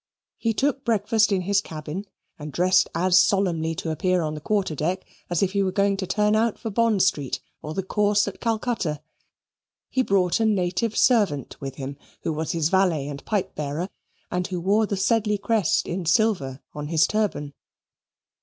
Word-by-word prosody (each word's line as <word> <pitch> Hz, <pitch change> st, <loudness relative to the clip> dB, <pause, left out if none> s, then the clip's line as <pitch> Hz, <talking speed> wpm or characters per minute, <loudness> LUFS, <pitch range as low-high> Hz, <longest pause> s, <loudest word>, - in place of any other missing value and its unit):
He 230 Hz, -, +1 dB
took 275 Hz, +1 st, 0 dB
breakfast 220 Hz, -1 st, +2 dB
in 190 Hz, -2 st, +2 dB
his 195 Hz, +2 st, +2 dB
cabin 160 Hz, +3 st, -6 dB, 0.3 s
and 150 Hz, 0 st, -6 dB
dressed 185 Hz, +4 st, +3 dB
as 185 Hz, +2 st, +4 dB
solemnly 170 Hz, -5 st, +1 dB
to 160 Hz, -, -3 dB
appear 180 Hz, +2 st, +1 dB
on 155 Hz, -1 st, -2 dB
the 150 Hz, -, -7 dB
quarter 200 Hz, -1 st, 0 dB
deck 175 Hz, +6 st, -2 dB, 0.2 s
as 175 Hz, +1 st, +1 dB
if 190 Hz, -, +1 dB
he 200 Hz, 0 st, +1 dB
were 190 Hz, -1 st, +1 dB
going 200 Hz, 0 st, +2 dB
to 190 Hz, -1 st, -3 dB
turn 210 Hz, +2 st, +2 dB
out 225 Hz, 0 st, +1 dB
for 225 Hz, -, -5 dB
Bond 225 Hz, -2 st, +3 dB
Street, 145 Hz, -8 st, 0 dB, 0.2 s
or 155 Hz, +1 st, -6 dB
the 195 Hz, -, -1 dB
Course 205 Hz, +1 st, +2 dB
at 200 Hz, -, -6 dB
Calcutta. 220 Hz, -9 st, -1 dB, 0.9 s
He 260 Hz, -, +2 dB
brought 195 Hz, -4 st, +2 dB
a 225 Hz, -, +2 dB
native 205 Hz, +2 st, 0 dB
servant 200 Hz, -, +2 dB
with 135 Hz, -1 st, -5 dB
him, 140 Hz, 0 st, -6 dB, 0.3 s
who 160 Hz, -, -1 dB
was 155 Hz, +1 st, -2 dB
his 165 Hz, -2 st, +1 dB
valet 180 Hz, -7 st, +2 dB
and 140 Hz, -1 st, -7 dB
pipe 195 Hz, -3 st, -1 dB
bearer 150 Hz, +5 st, -3 dB, 0.4 s
and 180 Hz, 0 st, -1 dB
who 185 Hz, -2 st, -3 dB
wore 205 Hz, +5 st, +2 dB
the 200 Hz, -, -2 dB
Sedley 210 Hz, +1 st, +2 dB
crest 205 Hz, -3 st, +1 dB
in 175 Hz, -1 st, -3 dB
silver 165 Hz, -, +1 dB
on 150 Hz, 0 st, -5 dB
his 160 Hz, 0 st, +3 dB
turban. 205 Hz, -9 st, -1 dB
190 Hz, 185 wpm, -24 LUFS, 160-210 Hz, 0.9 s, as